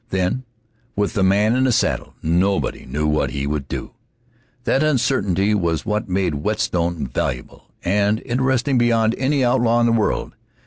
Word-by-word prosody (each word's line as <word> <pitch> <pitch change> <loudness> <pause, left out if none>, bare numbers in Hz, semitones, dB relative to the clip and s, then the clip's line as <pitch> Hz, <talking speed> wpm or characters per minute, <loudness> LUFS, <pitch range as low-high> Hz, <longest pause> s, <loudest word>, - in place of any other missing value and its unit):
Then, 95 +7 -1 0.5
with 100 0 0
the 105 - 0
man 100 +4 +3
in 130 +1 +2
the 130 - +3
saddle, - - 0
nobody 90 +5 0
knew 75 +4 -2
what 75 0 +1
he 70 0 -3
would 70 -1 -3
do. - - -5 0.7
That 135 - +1
uncertainty 105 - +1
was 85 -6 0
what 105 -1 -2
made 90 -6 -1
Whetstone 85 -5 -1
valuable 60 0 -4
and 105 +3 +1
interesting 130 +1 +1
beyond 115 -1 +2
any 135 0 +1
outlaw 120 -1 +2
in 120 - +3
the 120 - +3
world. 115 -2 0
105 Hz, 155 wpm, -21 LUFS, 90-120 Hz, 0.7 s, man